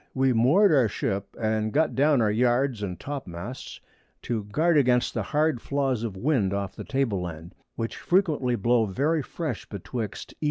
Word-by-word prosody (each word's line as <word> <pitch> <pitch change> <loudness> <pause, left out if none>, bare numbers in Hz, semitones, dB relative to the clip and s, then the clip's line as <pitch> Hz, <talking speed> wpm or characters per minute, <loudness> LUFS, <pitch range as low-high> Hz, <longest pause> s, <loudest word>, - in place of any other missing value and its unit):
We 130 -1 +3
moor'd 150 - +5
our 130 -6 +4
Ship, 100 -1 -2
and 110 -1 0
got 155 +5 +2
down 140 -3 +3
our 105 - +2
Yards 120 +1 +1
and 90 -4 -4
Topmasts 125 -4 -7 0.4
to 110 -4 -2
guard 160 +11 +1
against 125 -4 +3
the 115 - -1
hard 150 +3 0
Flaws 135 -4 -1
of 110 -5 -4
Wind 105 -5 +1
off 100 -2 -4
the - - -7
Table 130 -9 -1
Land, 85 +1 -7 0.2
which 115 0 -4
frequently 155 -9 +1
blow 115 +1 +2
very 145 - 0
fresh 145 -3 -5
betwixt 105 +2 -6
E. - - -36
120 Hz, 170 wpm, -26 LUFS, 105-140 Hz, 0.4 s, moor'd